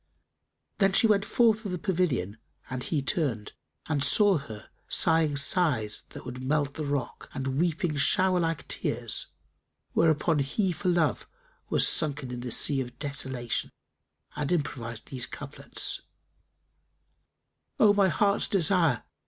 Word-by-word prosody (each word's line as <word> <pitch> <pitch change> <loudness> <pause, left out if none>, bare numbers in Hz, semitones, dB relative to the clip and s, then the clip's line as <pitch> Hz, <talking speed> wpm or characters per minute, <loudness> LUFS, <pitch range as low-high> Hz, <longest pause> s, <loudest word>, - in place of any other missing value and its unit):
Then 195 -1 +3
she 225 - +5
went 205 -2 +3
forth 225 -2 +2
of 200 - -4
the 180 - -2
pavilion, 160 - -1 0.3
and 130 -1 -3
he 150 -5 -2
turned 130 - -2 0.3
and 145 -3 -1
saw 205 -2 +4
her 110 -6 -11 0.2
sighing 160 -3 +3
sighs 140 - +2
would 125 0 -8
melt 145 +1 0
the 155 0 -5
rock 140 -4 -4
and 135 +1 -2
weeping 170 -2 0
shower 185 +5 +3
like 165 -2 -2
tears; - - 0 0.7
whereupon 160 -1 +2
he 180 +8 0
for 180 +2 -2
love 175 -3 0 0.4
was - - +4
sunken 145 -4 0
in 125 - -5
the 125 0 -5
sea 135 +3 +2
of 125 -1 -8
desolation 130 -4 -2 0.7
and 150 +1 -3
improvised 120 -9 -3
these 130 -2 -2
couplets, 140 +1 -3 1.8
"O 210 -2 +6
my 200 -1 +3
heart's 200 +4 +1
desire! 170 - +2
150 Hz, 135 wpm, -27 LUFS, 130-180 Hz, 1.8 s, O